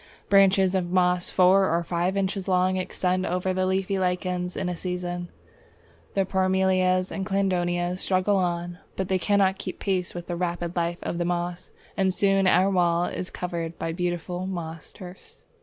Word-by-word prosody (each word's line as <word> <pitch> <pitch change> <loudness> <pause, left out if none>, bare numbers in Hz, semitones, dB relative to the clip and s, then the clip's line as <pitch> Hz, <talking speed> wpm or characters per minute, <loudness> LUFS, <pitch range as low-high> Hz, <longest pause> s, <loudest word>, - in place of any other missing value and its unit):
Branches 195 -1 +5
of 180 -2 0
moss 180 -1 +2
four 190 +1 +4
or 170 +1 +1
five 175 +3 -1
inches 195 0 -1
long 185 0 +2
extend 185 0 -1
over 180 +1 -1
the 185 0 0
leafy 190 +1 0
lichens 180 -1 -1
in 190 - -2
a 180 - -2
season. 175 0 -4 0.9
The 195 -1 +2
Parmelias 185 -1 +2
and 195 - -3
Cladonias 180 -2 0
struggle 190 +2 +1
on, 175 -1 -2 0.2
but 190 0 -3
they 190 -1 +2
cannot 195 0 +2
keep - - -5
pace 185 -3 -1
with 175 -1 -5
the 175 - -4
rapid 175 0 -3
life 170 0 -1
of 170 - -3
the 175 - 0
moss, 175 +1 -3 0.3
and 190 -1 +2
soon 195 0 +2
our 185 +2 +4
wall 175 -2 +2
is 180 - -4
covered 170 -2 -4
by 165 - -3
beautiful 175 +1 -3
moss 165 -4 -6
turfs. 185 -1 -12
180 Hz, 170 wpm, -25 LUFS, 175-190 Hz, 0.9 s, Branches